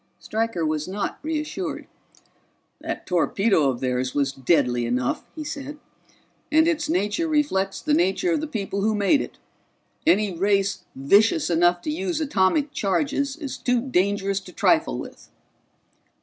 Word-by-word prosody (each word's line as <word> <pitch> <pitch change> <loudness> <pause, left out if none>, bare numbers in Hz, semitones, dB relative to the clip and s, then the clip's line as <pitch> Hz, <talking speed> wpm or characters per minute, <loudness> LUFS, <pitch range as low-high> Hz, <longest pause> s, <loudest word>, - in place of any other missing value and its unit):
Stryker 220 -6 -2
was 155 0 -1
not 195 +2 -3
reassured. 315 +4 -3 0.9
"That - - -5
torpedo 180 -2 +2
of 125 -2 -3
theirs 130 0 -1
was 140 -2 +1
deadly 130 -3 +1
enough," 125 +1 -1
he 310 - -5
said. 295 0 -6 0.7
"And 315 +1 +5
its 310 -3 0
nature 325 - 0
reflects 295 -11 0
the 300 - 0
nature 195 - +2
of 315 -3 +1
the 310 - -3
people 200 -6 -3
who 215 +1 +1
made 210 +8 +3
it. - - -8 0.7
Any 210 - +3
race 195 +2 +1
vicious 205 - +3
enough 175 +1 +3
to 305 - -2
use 330 +1 -2
atomic 280 +1 +1
charges 280 +7 0
is 290 -5 -6
too 250 -1 +1
dangerous 200 -4 0
to 190 -1 -13
trifle - - +2
with." - - -9
205 Hz, 145 wpm, -24 LUFS, -, 0.9 s, And